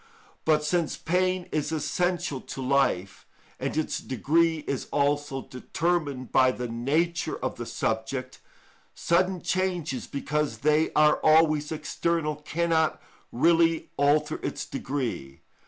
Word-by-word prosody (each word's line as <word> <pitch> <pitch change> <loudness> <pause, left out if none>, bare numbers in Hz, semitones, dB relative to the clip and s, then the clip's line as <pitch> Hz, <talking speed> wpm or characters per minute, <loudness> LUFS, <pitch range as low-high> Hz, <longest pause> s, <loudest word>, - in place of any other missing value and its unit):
But 155 -1 +3
since 165 +1 0
pain 185 +2 0
is 155 0 -1
essential 175 -2 -1
to - - -8
life, 125 -9 0 0.3
and - - -3
its 155 - -1
degree 160 +5 +1
is 140 - -2
also 145 -1 0
determined 145 -1 -2
by 130 -1 +5
the 125 -1 -4
nature 155 +9 -1
of 130 - -4
the 120 - -6
subject, 130 +4 -3 0.5
sudden 180 +1 +1
changes, 180 -8 -1
because 150 +1 -2
they 155 +1 +3
are 150 0 +4
always 155 -1 +4
external, 160 -1 -1
cannot 160 +1 0 0.3
really 165 +4 +3
alter 145 +2 +2
its - - -4
degree. 120 - -4
150 Hz, 120 wpm, -27 LUFS, 135-165 Hz, 0.5 s, by